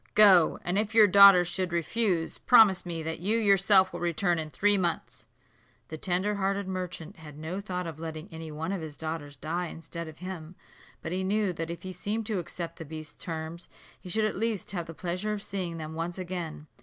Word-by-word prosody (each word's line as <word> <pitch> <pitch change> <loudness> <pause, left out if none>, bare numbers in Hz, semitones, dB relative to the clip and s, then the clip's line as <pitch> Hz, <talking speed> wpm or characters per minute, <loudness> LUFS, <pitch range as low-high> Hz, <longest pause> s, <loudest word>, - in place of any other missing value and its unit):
Go; 190 -6 +7
and 180 +3 0
if 215 +1 -2
your 220 -2 +9
daughters 200 -2 +8
should 180 0 -2
refuse, 170 0 0
promise 215 -7 +5
me 165 -2 -4
that 160 0 -4
you 205 +6 +1
yourself 195 -2 +4
will - - -5
return 175 0 0
in 155 -1 -4
three 205 +9 +2
months." 170 -9 -2 0.6
The 155 - -6
tender 185 +4 0
hearted 195 0 -1
merchant 185 -1 -5
had 150 -2 -12
no 165 +6 -5
thought 180 -3 -4
of 160 -2 -7
letting 160 -1 -6
any 160 -1 -7
one 160 +4 -4
of 195 -3 -3
his 155 -2 -7
daughters 155 -3 -5
die 170 +6 -3
instead 170 0 -7
of 160 0 -11
him; 180 -2 -7 0.5
but 160 - -4
he 185 +1 -1
knew 200 0 +1
that 165 -1 -4
if 170 - -6
he 185 0 -6
seemed 210 +5 -3
to 210 -3 -1
accept 170 0 -6
the - - -7
beast's 155 0 -9
terms, 165 +1 -6 0.3
he 185 - -11
should 215 +4 +1
at 215 - -1
least 220 -1 -2
have 175 -4 -4
the 165 - -9
pleasure 185 +5 -3
of 210 -1 -3
seeing 180 -5 -4
them 155 -1 -6
once 165 +2 -4
again. 175 -5 -5
175 Hz, 210 wpm, -28 LUFS, 160-195 Hz, 0.6 s, your